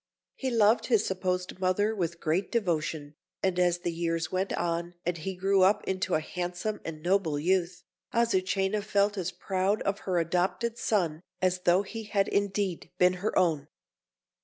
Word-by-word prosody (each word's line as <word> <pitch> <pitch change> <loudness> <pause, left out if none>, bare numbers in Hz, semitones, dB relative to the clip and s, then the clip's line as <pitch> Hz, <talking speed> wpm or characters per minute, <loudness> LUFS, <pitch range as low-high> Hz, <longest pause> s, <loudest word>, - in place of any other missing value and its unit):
He 265 - -3
loved 225 -1 +3
his 225 -4 +3
supposed 185 -1 -2
mother 190 +4 +1
with 170 -4 -2
great 175 +4 0
devotion, 160 -8 -1 0.3
and 185 -2 +1
as 175 -1 +2
the 175 - -1
years 165 0 -1
went 185 +1 -1
on, 170 +1 -2
and 175 0 0
he 185 +4 -5
grew 195 +1 +2
up 190 +3 +4
into 190 -1 0
a - - +3
handsome 180 +6 -4
and 155 -1 -7
noble 175 -4 +1
youth, 180 +3 0 0.3
Azucena 195 -3 +1
felt 205 0 +1
as 185 -2 -2
proud 190 +3 -1
of 200 +1 -1
her 180 - +2
adopted 180 +7 0
son 170 -7 0 0.2
as 185 0 +1
though 180 +3 +4
he 225 +2 -7
had 200 -2 +1
indeed 200 -3 -1
been 180 0 +5
her 215 - -1
own. 155 -5 +2
185 Hz, 165 wpm, -29 LUFS, 175-200 Hz, 0.3 s, been